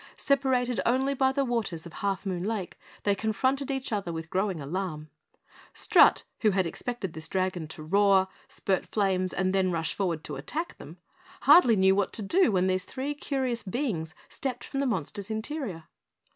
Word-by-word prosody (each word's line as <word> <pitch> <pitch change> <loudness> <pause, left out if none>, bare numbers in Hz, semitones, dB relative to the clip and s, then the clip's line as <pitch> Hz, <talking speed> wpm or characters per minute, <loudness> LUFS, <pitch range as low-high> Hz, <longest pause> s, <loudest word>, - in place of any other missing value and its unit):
Separated 260 -3 +1
only 265 +3 +2
by 265 -1 +2
the 275 0 0
waters 220 -10 -2
of 170 - -10
Half 200 0 -2
Moon 180 -2 -2
Lake, 205 -3 -3 0.2
they 200 - +3
confronted 260 +7 0
each 270 -3 -3
other 200 -4 -2
with 160 0 -6
growing 190 -2 0
alarm. 155 0 -4 0.6
Strut, - - +5 0.2
who 215 - +4
had 190 -2 +1
expected 195 +1 -4
this 155 0 -7
dragon 185 -4 -1
to 155 0 -8
roar, 195 +2 +4 0.2
spurt 190 -2 -1
flames 190 -3 +1
and 185 0 0
then 190 -1 +2
rush 165 -2 -1
forward 170 -6 -2
to 150 - -5
attack 305 - -4
them, - - -11 0.4
hardly 245 -10 +7
knew 190 -1 +5
what 200 -1 0
to 215 - -2
do 335 - +3
when 185 -2 +2
these 185 0 +1
three 275 +2 -4
curious 265 -5 -2
beings 185 - -3
stepped 250 -3 -4
from 275 - -4
the 280 - +1
monster's 210 -3 -3
interior. 220 - -4
200 Hz, 175 wpm, -28 LUFS, 185-250 Hz, 0.6 s, hardly